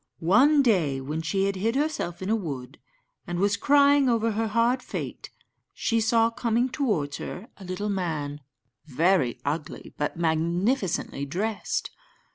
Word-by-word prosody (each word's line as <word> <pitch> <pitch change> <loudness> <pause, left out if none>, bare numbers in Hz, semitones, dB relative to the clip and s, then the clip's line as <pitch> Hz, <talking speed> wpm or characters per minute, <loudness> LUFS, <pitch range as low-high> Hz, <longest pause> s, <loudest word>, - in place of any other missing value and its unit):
One 265 - +4
day, 170 - +2
when 150 +4 -4
she 180 +5 0
had 200 0 -1
hid 225 +6 0
herself 275 - -2
in 195 - -1
a - - +4
wood, 140 - -6 0.5
and 175 0 -3
was 200 +2 +2
crying 285 -1 +4
over 230 -1 +2
her 220 +1 -1
hard 235 +4 +2
fate, - - -6 0.5
she 230 -1 0
saw 225 +1 +3
coming 235 +2 0
towards 200 - -1
her 205 +8 -7
a 195 - -12
little 185 +3 -4
man, 155 -7 -3 0.5
very 165 -4 +2
ugly, 150 +1 -4
but 150 - -2
magnificently 170 - 0
dressed. 205 +8 -2
195 Hz, 145 wpm, -26 LUFS, 160-230 Hz, 0.5 s, One